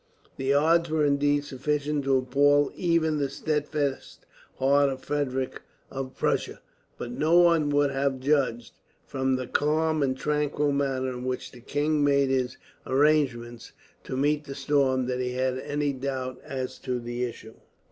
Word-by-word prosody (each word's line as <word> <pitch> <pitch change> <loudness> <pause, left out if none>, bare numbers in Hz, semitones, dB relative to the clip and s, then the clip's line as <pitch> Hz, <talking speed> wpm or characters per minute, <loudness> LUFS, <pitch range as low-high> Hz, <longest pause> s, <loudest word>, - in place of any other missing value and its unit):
The 135 0 0
odds 165 +4 +3
were 155 -1 +2
indeed 145 0 +2
sufficient 145 +1 -2
to 135 -1 +3
appall 145 +3 +3
even 165 -3 +1
the 140 -1 0
steadfast 150 -1 -3 0.3
heart 140 +1 +3
of 130 -1 -6
Frederick 135 -3 -2 0.3
of 135 -1 -6
Prussia; - - -1 0.4
but 120 - -6
no 155 +7 +2
one 170 -4 +4
would 145 -1 +2
have 135 -1 -1
judged, 130 -4 0 0.3
from 130 0 0
the 130 0 -3
calm 155 +3 +1
and 130 -2 0
tranquil 150 0 0
manner 135 -2 0
in 125 -1 -6
which 130 0 -4
the 125 - -14
king 145 +3 0
made 140 -1 +3
his 130 -2 -1 0.3
arrangements 130 -5 +1 0.3
to 130 - -4
meet 150 +2 +1
the 140 -1 -7
storm, 135 -2 +1
that 125 0 -2
he 125 0 -2
had 130 0 -1
any 145 +1 -1
doubt 130 -1 -4
as 130 -1 -5
to 125 -2 -3
the 120 +1 -4
issue. 115 -2 -6
140 Hz, 155 wpm, -26 LUFS, 130-145 Hz, 0.4 s, one